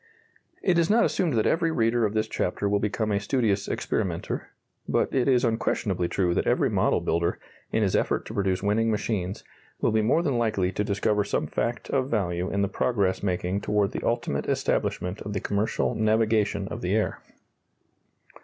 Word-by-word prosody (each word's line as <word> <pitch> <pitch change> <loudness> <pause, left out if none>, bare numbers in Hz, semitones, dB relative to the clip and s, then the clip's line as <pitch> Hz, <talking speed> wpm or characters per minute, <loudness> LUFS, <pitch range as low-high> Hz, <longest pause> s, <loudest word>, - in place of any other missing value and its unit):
It 175 -3 +3
is 170 - +2
not 230 +3 +5
assumed 170 -6 0
that 110 -2 +2
every 165 0 +2
reader 115 -5 +2
of 105 - -7
this 110 0 +1
chapter 100 +1 -1
will 100 0 +2
become 105 +1 -1
a 100 - +2
studious 100 -3 0
experimenter, 90 -6 -2 0.4
but - - +1
it 130 -1 +2
is 125 -2 +4
unquestionably 105 -5 0
true 90 -1 0
that - - 0
every - - +2
model - - +2
builder, 85 +1 0 0.3
in 110 - +1
his 95 - +1
effort - - 0
to - - -7
produce 95 -2 0
winning 110 +3 +2
machines, 105 -3 -2 0.4
will - - +2
be 110 0 +2
more 130 +10 +2
than 140 -7 0
likely 105 -5 +1
to 105 - -1
discover 105 0 +1
some 100 - -1
fact 120 +1 -2
of 135 -1 0
value 90 -5 -1
in 100 0 0
the - - +2
progress 100 -2 0
making 90 0 -1
toward 105 0 +1
the - - -4
ultimate 115 -12 -1
establishment 90 +3 -1
of 105 - -5
the 100 - -1
commercial 105 +4 0
navigation 110 -2 +1
of - - -6
the 90 +3 0
air. 110 - 0
105 Hz, 185 wpm, -26 LUFS, 100-115 Hz, 0.4 s, not